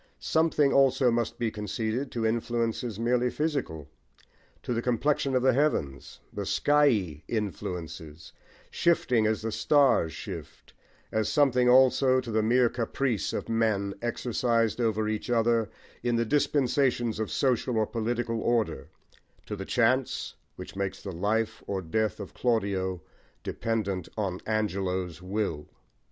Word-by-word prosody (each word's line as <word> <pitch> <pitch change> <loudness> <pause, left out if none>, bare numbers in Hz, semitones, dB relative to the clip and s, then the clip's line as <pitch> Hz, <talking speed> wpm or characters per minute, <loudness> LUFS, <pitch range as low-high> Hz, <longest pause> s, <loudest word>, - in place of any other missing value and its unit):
Something 160 -3 +2
also 135 -2 +4
must 115 -1 -1
be 115 -2 -1
conceded 110 +5 -3
to 115 -2 -1
influences 115 -1 -1
merely 125 +1 +2
physical, 135 - -3 0.8
to 125 - -2
the 115 - -1
complexion 135 +3 0
of 125 - +2
the 130 -1 +4
heavens, 120 - -1
the - - -3
skyey 115 - +2
influences, 85 -7 -5 0.4
shifting 125 -10 +2
as 110 0 -1
the 115 - -2
stars 135 - +3
shift; - - -9 0.4
as 110 -1 0
something 125 -4 +3
also 130 +1 +5
to 125 -2 -5
the 110 0 +2
mere 120 +3 +4
caprice 120 -1 -1
of - - -4
men 110 -3 0
exercised 120 -1 0
over 110 -2 +1
each 110 +2 -3
other 115 -2 +2 0.3
in 120 -1 0
the 115 0 +1
dispensations 130 -3 +1
of 110 - -2
social 125 -2 0
or 110 - +3
political 115 0 -2
order, 120 -2 0 0.6
to - - -5
the - - -6
chance - - +1 0.2
which - - -9
makes 100 -1 -3
the 100 - -5
life 105 +5 -1
or 100 - -2
death 105 +5 -1
of 100 - -8
Claudio 95 -7 -1 0.4
dependent 100 -6 -2
on 95 -4 -2
Angelo's 95 -5 -2
will. 90 -6 -3
115 Hz, 135 wpm, -28 LUFS, 100-125 Hz, 0.8 s, also